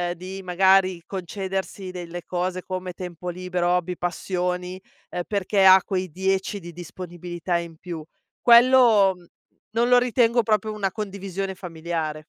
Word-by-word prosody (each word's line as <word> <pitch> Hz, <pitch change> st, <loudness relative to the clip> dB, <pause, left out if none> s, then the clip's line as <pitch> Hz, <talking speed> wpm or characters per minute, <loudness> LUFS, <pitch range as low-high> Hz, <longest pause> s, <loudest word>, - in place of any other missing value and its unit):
di, 185 Hz, +3 st, -8 dB
magari, 185 Hz, 0 st, +3 dB
concedersi 190 Hz, 0 st, -4 dB
delle 175 Hz, -1 st, -7 dB
cose, 185 Hz, 0 st, -2 dB
come 185 Hz, -1 st, -5 dB
tempo 180 Hz, -1 st, -7 dB
libero, 180 Hz, 0 st, -2 dB
hobby, 180 Hz, 0 st, 0 dB
passioni, 180 Hz, +1 st, -3 dB, 0.5 s
perché 200 Hz, -1 st, +1 dB
ha 190 Hz, 0 st, +9 dB
quei 185 Hz, -2 st, -2 dB
10 190 Hz, +3 st, -1 dB
di 175 Hz, -1 st, -9 dB
disponibilità 175 Hz, 0 st, -5 dB
in 170 Hz, -2 st, -7 dB
più. 170 Hz, -3 st, -7 dB, 0.4 s
Quello, 235 Hz, -5 st, +6 dB
mhmm, 175 Hz, -, -19 dB, 0.5 s
non 235 Hz, +1 st, +2 dB
lo 250 Hz, -, +7 dB
ritengo 240 Hz, -1 st, +3 dB
proprio 215 Hz, 0 st, +1 dB
una 200 Hz, -2 st, -1 dB
condivisione 195 Hz, -2 st, -5 dB
familiare. 165 Hz, -3 st, -4 dB
185 Hz, 130 wpm, -24 LUFS, 175-195 Hz, 0.5 s, ha